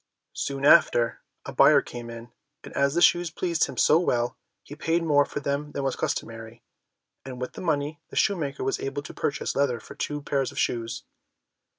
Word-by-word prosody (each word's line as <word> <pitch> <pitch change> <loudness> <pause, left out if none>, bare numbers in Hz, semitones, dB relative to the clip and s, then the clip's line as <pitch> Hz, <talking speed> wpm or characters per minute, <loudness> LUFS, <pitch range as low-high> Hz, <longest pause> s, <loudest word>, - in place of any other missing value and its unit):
Soon 140 0 -3
after, 120 -6 +5 0.2
a - - -7
buyer 140 +1 +6
came 120 -3 -8
in, 115 0 -9 0.3
and - - -11
as 140 +2 +2
the 175 - +3
shoes 175 -1 +4
pleased 170 0 0
him - - -9
so 155 - +5
well, 120 -8 0 0.3
he - - -11
paid 165 +2 0
more 145 -3 +4
for 145 - -5
them 140 +2 -3
than 140 - -3
was 135 - -1
customary, 115 +1 -4 0.6
and, 130 -2 -8
with 125 - -5
the - - -8
money, 150 -3 -1
the - - -11
shoemaker 150 -10 0
was 135 - -1
able 140 +1 -4
to - - -9
purchase 145 - -2
leather 135 -4 +1
for - - -12
two 145 0 -3
pairs 135 -2 -1
of - - -14
shoes. 115 -1 -2
140 Hz, 195 wpm, -26 LUFS, 125-150 Hz, 0.6 s, buyer